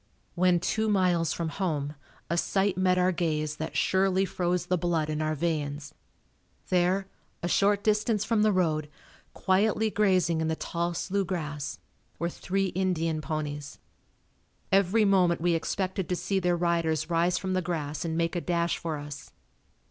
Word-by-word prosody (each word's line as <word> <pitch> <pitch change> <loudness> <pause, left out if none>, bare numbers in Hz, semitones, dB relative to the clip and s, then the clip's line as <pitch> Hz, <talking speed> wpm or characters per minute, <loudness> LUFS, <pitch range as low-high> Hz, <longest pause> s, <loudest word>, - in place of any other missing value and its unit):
When 180 -1 +3
two 220 +5 0
miles 180 -5 +2
from 170 -2 -2
home 155 -6 -2 0.3
a 170 - -1
sight 195 +3 +1
met 185 0 +2
our 180 0 +3
gaze 155 -3 -1
that 160 - -4
surely 190 0 +2
froze 180 -1 -1
the 180 - +1
blood 165 -3 0
in 155 0 -2
our 155 0 0
veins. 150 -2 -2 0.8
There, 185 +2 +2 0.4
a - - 0
short 200 +3 +2
distance 215 0 +1
from 215 +1 +2
the 215 0 +4
road, 155 -5 0 0.5
quietly 215 +3 +2
grazing 185 -6 +2
in 160 - 0
the 160 - 0
tall 170 +1 -2
slough 195 +2 -1
grass, 150 -5 -4 0.4
were 170 - -1
three 195 +2 -1
Indian 165 -4 -1
ponies. 150 -1 -4 0.9
Every 200 +3 +4
moment 185 -3 +3
we 175 +1 +2
expected 185 +2 -2
to 180 - +1
see 180 +2 -1
their 175 -1 +1
riders 170 -2 0
rise 170 +2 +2
from 190 0 -2
the 185 - +1
grass 155 -4 -3
and 165 -1 -2
make 165 +1 0
a 175 - -1
dash 170 -1 0
for 160 -2 -3
us. 145 0 -8
175 Hz, 165 wpm, -28 LUFS, 160-190 Hz, 0.9 s, the